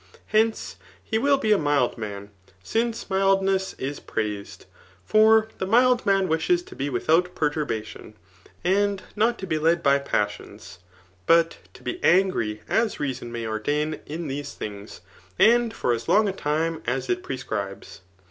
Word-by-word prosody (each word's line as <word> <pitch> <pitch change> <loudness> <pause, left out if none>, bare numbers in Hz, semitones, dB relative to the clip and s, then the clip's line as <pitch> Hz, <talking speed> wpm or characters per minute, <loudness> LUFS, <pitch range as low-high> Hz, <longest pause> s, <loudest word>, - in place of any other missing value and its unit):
Hence, 220 +1 +1 0.3
he 220 - -1
wiU 280 +2 +3
be 220 -5 0
a 210 - +5
mild 145 -4 +1
man, 100 -3 -7 0.3
since 230 - -1
mikUiess 195 0 +1
is 140 +2 -4
pi^aised. 105 -2 -5 0.4
For 220 +1 +5
the 190 - -2
mihl 250 +4 +5
ipan 195 -1 +2
wishes 265 - +1
to - - -13
be 140 +2 -2
without 165 +8 +1
perturbadon, 145 -9 -3 0.5
and 200 +1 +1
not 225 +3 +2
to 190 - -6
be 155 -4 -1
led 165 +2 +2
by 140 0 +4
passiim; 105 -7 -4 0.5
but 165 0 +4 0.2
to - - -15
be 365 - -4
angi^ 175 - +2
as 225 -1 0
reason 130 -4 -4
msqr 115 -1 -4
ordain 150 +6 -1
in 160 +2 -5
tbest^ 145 +1 -5
things 100 -1 -8 0.4
and 235 +1 +4
for 125 - 0
as 115 0 -4
long 215 +1 +4
^ 195 -2 -2
time 160 +1 -1
as 130 +1 -1
it 180 0 -1
prescribes. 105 - -6
160 Hz, 155 wpm, -24 LUFS, 125-205 Hz, 0.5 s, a